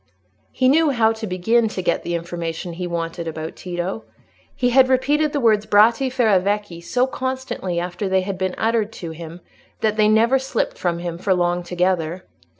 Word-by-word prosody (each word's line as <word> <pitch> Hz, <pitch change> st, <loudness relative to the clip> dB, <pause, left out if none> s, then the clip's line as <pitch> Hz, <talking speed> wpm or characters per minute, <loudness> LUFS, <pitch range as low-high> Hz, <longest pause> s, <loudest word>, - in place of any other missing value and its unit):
He 255 Hz, -, +1 dB
knew 310 Hz, +4 st, +4 dB
how 230 Hz, -5 st, +3 dB
to 220 Hz, -1 st, -5 dB
begin 225 Hz, +6 st, +2 dB
to 205 Hz, -3 st, -4 dB
get 170 Hz, -, +1 dB
the 175 Hz, -, -3 dB
information 170 Hz, 0 st, -4 dB
he 180 Hz, +1 st, -4 dB
wanted 170 Hz, 0 st, -4 dB
about 160 Hz, 0 st, -5 dB
Tito. 180 Hz, +4 st, -4 dB, 0.5 s
He 245 Hz, -1 st, +1 dB
had 260 Hz, +1 st, +5 dB
repeated 290 Hz, +4 st, +2 dB
the 290 Hz, -, -1 dB
words 215 Hz, -4 st, +2 dB
"Bratti 230 Hz, +6 st, +4 dB
Ferravecchi" 205 Hz, -6 st, +1 dB
so 250 Hz, +7 st, +1 dB
constantly 260 Hz, -9 st, -3 dB
after 180 Hz, +3 st, -3 dB
they 190 Hz, 0 st, +2 dB
had 195 Hz, +1 st, -4 dB
been 185 Hz, -1 st, -1 dB
uttered 225 Hz, -1 st, 0 dB
to 170 Hz, -2 st, -7 dB
him, 165 Hz, +1 st, -9 dB, 0.4 s
that 215 Hz, -1 st, +1 dB
they 215 Hz, -1 st, +4 dB
never 230 Hz, +5 st, +4 dB
slipped 260 Hz, -3 st, -2 dB
from 175 Hz, -2 st, 0 dB
him 170 Hz, -1 st, -5 dB
for 190 Hz, 0 st, +1 dB
long 175 Hz, 0 st, 0 dB
together. 180 Hz, -1 st, -1 dB
195 Hz, 180 wpm, -21 LUFS, 175-235 Hz, 0.5 s, had